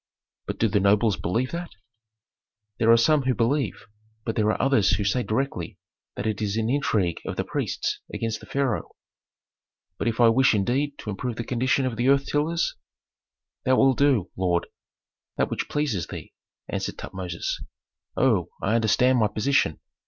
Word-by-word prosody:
"But - - -3
do 115 - +2
the 105 0 +2
nobles 100 +2 +3
believe 115 +8 -1
that?" 170 0 -4 1.1
"There 115 0 +5
are 115 - +7
some 150 +6 +4
who 130 -1 0
believe, 120 -2 0 0.4
but 115 - -2
there 110 -1 +2
are - - -3
others 135 -9 +3
who 100 +2 0
say 100 +6 +1
directly 115 -6 -2 0.4
that - - -4
it 110 -1 -1
is 105 0 -1
an 115 +1 0
intrigue 105 - 0
of - - -4
the - - -1
priests - - -2
against 115 -1 -3
the - - -14
pharaoh." 135 -5 -1 1.0
"But - - -1
if 115 0 -1
I 120 -1 +7
wish 130 0 +4
indeed 135 +8 0
to 105 - -4
improve 115 +4 -4
the 115 - -4
condition 130 +3 +1
of 120 -3 -3
earth 135 +3 +3
tillers?" 160 +3 0 0.9
"Thou 130 0 +3
wilt 135 -2 +4
do, 130 -11 +3
lord, 90 -2 +1 0.7
that - - 0
which - - -3
pleases 140 - -1
thee," - - -9 0.3
answered - - -3
Tutmosis. 90 -3 -4 0.6
"Oh, - - +2
I 105 - 0
understand 125 +3 +3
my 110 - +4
position!" 110 - +1
115 Hz, 165 wpm, -25 LUFS, 105-135 Hz, 1.1 s, are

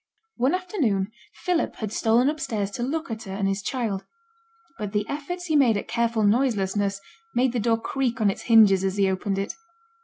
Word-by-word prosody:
One 265 +8 +2
afternoon 265 - -1 0.3
Philip 360 -3 0
had 215 -2 -5
stolen 235 +3 +3
upstairs 220 -9 -2
to 240 - -5
look 310 +4 -2
at 225 0 -5
her 190 - -6
and 195 0 -1
his 195 +1 -1
child; 215 -4 -2 0.8
but 210 -1 -4
the 210 0 0
efforts 355 +5 -4
he 315 -3 0
made 250 -7 +5
at - - -5
careful 230 -2 0
noiselessness 205 -3 +1 0.4
made 250 +1 +3
the 245 - 0
door 225 +1 +2
creak 255 0 -2
on 210 -2 +3
its - - -8
hinges 205 -4 +6
as 190 +1 -1
he 200 -1 +3
opened 190 +1 -1
it. 195 +1 -2
225 Hz, 190 wpm, -25 LUFS, 200-260 Hz, 0.8 s, hinges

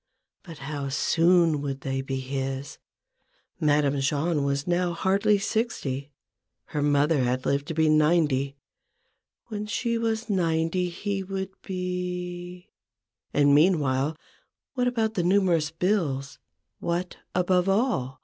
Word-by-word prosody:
But 165 -4 -11
how 140 -2 -3
soon 165 +1 +3
would 135 -1 -4
they 135 0 -2
be 135 0 -3
his? 135 +1 -4 0.8
Madame 145 -2 +2
Jahn 145 +3 0
was 140 0 -1
now 175 0 +1
hardly 200 +4 +2
sixty; 195 - -2 0.6
her 150 - 0
mother 145 +1 +3
had 125 +1 -1
lived 140 +1 0
to 165 - -4
be 160 0 +3
ninety; 150 -3 +3 0.9
when 210 -1 -4
she 230 +1 -1
was 225 0 -1
ninety 175 -2 +1
he 200 +3 -3
would 190 0 -4
be 180 0 -5 0.3
—. 105 -2 -61
And 145 -1 +4
meanwhile, 150 -3 +3 0.6
what 250 -2 +1
about 225 -3 0
the 190 - 0
numerous 175 -4 +2
bills; 160 -6 -1 0.4
what 175 +1 -2 0.2
(above 180 +1 +2
all 195 - 0
165 Hz, 125 wpm, -26 LUFS, 140-185 Hz, 0.9 s, And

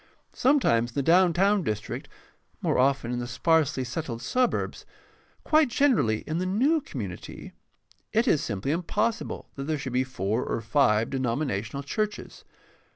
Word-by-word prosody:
Sometimes 245 - +3
in - - -14
the 140 - 0
down 175 +4 +5
town 195 +4 +3
district, 105 - -4 0.5
more - - 0
often 130 -2 +2
in 120 - -2
the 120 - -4
sparsely 145 +2 +1
settled 125 -2 -5
suburbs, 250 - 0 0.6
quite 310 -1 +4
generally 230 - +2
in 160 +2 -3
the 185 - -1
new 270 - +2
community, 105 - -7 0.6
it 230 +4 +2
is 155 - +3
simply 105 +5 -2
impossible 210 +7 -2
that 135 - -6
there 155 +1 -1
should 130 -3 -5
be 130 +1 +2
four 115 -2 -2
or - - -2
five 115 -1 +2
denominational 130 -1 -2
churches. 210 +9 -4
140 Hz, 150 wpm, -26 LUFS, 120-195 Hz, 0.6 s, down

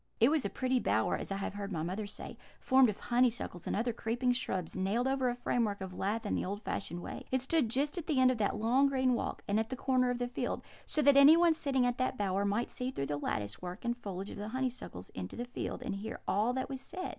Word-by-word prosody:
It 235 +5 +6
was 310 -4 +2
a - - -1
pretty 255 0 0
bower, 110 - +1
as - - -5
I - - 0
have 195 - -3
heard 200 0 -5
my 160 -4 -2
mother 190 +5 -3
say, - - -7 0.2
formed 260 -2 +5
of 210 - -3
honeysuckles 240 -7 0
and - - 0
other 235 +3 0
creeping 240 +3 0
shrubs 190 -9 -2
nailed 205 +7 0
over 265 -1 +1
a 240 - -1
framework 230 -4 0
of 190 -1 -6
lath 210 +5 -2
in - - -1
the - - 0
old 205 +3 -4
fashioned 175 -2 -3
way. - - -7
It 260 - +1
stood 265 -1 +1
just 285 +8 0
at 325 - -8
the 290 -5 +2
end 255 0 +6
of 245 - -3
that 205 - +1
long 240 +6 +3
green 260 -2 +2
walk, 235 - -3
and 205 +2 +2
at 220 - -1
the 260 - -3
corner 255 -1 +2
of 245 - 0
the 245 0 -1
field; 245 - -3 0.2
so 305 - +1
that 280 0 +6
anyone 325 +4 +8
sitting 275 -5 0
in 245 0 +2
the 255 - +1
bower 200 0 0
might 205 +4 0
see 250 0 -2
through 140 - -3
the 145 +1 -2
lattice 105 -7 -3
work 180 +4 -7
and 235 0 +1
foliage 200 -4 -6
of - - -8
the 205 +1 -5
honeysuckles 250 - -4
into 90 0 -6
the 240 - -4
field, 245 +1 -5
and 220 -6 -3
hear 220 +3 -6
all 215 +5 +2
that 260 0 -2
was 265 -1 -5
said. 370 0 -5
240 Hz, 260 wpm, -32 LUFS, 200-260 Hz, 0.2 s, anyone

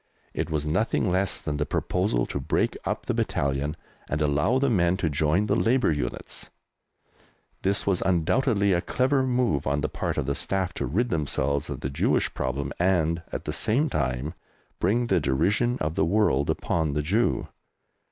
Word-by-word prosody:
It - - -2
was 75 -2 -1
nothing 95 +4 +1
less 95 +2 0
than 75 -1 -3
the 75 - 0
proposal - - 0
to - - -4
break 65 - 0
up - - -2
the - - 0
battalion 70 +3 -1 0.3
and 75 - -1
allow 75 - +2
the 140 +1 +2
men 90 -6 +2
to 80 -5 -1
join 80 +7 +2
Labour 120 0 +2
units! 70 -5 -4 1.1
This 100 +1 +1
was 95 -3 +1
undoubtedly 100 - +2
a 85 - +2
clever 130 +6 +1
move 125 - +1
on 70 +1 +1
the 75 - -1
part - - -3
of - - 0
the 70 - 0
Staff 95 +3 -1
to 70 - -3
rid 115 - 0
themselves 70 -2 0
of - - -5
the 65 - -2
Jewish 70 - +1
problem 70 +1 -2
and, 85 -2 +2
at - - -5
the - - -2
same 135 +8 +1
time, 65 +1 -1 0.5
bring 115 +7 +2
the - - +2
derision 100 - +1
of 75 0 -1
the 95 - +1
world 85 -7 +2
upon 80 -4 0
the 75 +1 -1
Jew. 105 +10 +1
85 Hz, 175 wpm, -26 LUFS, 70-105 Hz, 1.1 s, allow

